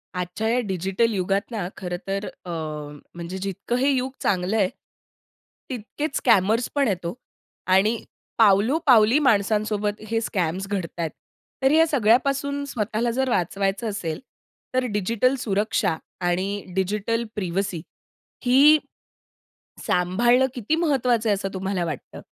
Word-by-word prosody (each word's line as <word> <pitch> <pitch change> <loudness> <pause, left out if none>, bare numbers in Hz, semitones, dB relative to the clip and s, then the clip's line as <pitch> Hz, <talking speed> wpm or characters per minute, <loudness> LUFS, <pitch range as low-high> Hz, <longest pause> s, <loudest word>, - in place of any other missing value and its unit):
आजच्या 180 +5 -3
या 245 - +2
डिजिटल 190 +5 0
युगात 195 +3 -1
ना 205 -6 -3
खरं 180 -2 -4
तर 195 +1 -2 0.2
अ, - - -8 0.7
म्हणजे 175 +2 -6
जितकं 195 +5 -3
हे 270 +3 +2
युग 260 -1 0
चांगलंय, 190 +2 +1 1.0
तितकेच 265 +4 -4
स्कॅमर्स 225 +1 +3
पण 280 -2 +3
आहेत 185 -4 -2
ओ 170 - -2 0.6
आणि 210 +5 +4 0.4
पावलो-पावली 225 - +5
माणसांसोबत 210 -3 +1
हे 225 0 +1
स्कॅम्स 185 -2 -2
घडतायेत. 170 -5 -3 0.5
तर 265 - +5
या 320 +2 +6
सगळ्यापासून 275 +2 +2
स्वतःला 230 -2 -1
जर 265 +2 0
वाचवायचं 195 +1 0
असेल 170 -6 -4 0.5
तर 255 0 +1
डिजिटल 230 +6 +1
सुरक्षा 210 -5 0 0.3
आणि 195 +3 -1
डिजिटल 210 +4 0
प्रीव्हसी 190 -3 -2 0.6
ही, 280 +5 +7 1.1
सांभाळणं 235 +9 +3
किती 245 +5 -1
महत्वाचं 255 -8 +1
आहे - - +4
असं 195 0 -3
तुम्हाला 190 -1 -2
वाटतं? 155 -5 -6
210 Hz, 120 wpm, -24 LUFS, 190-245 Hz, 1.1 s, ही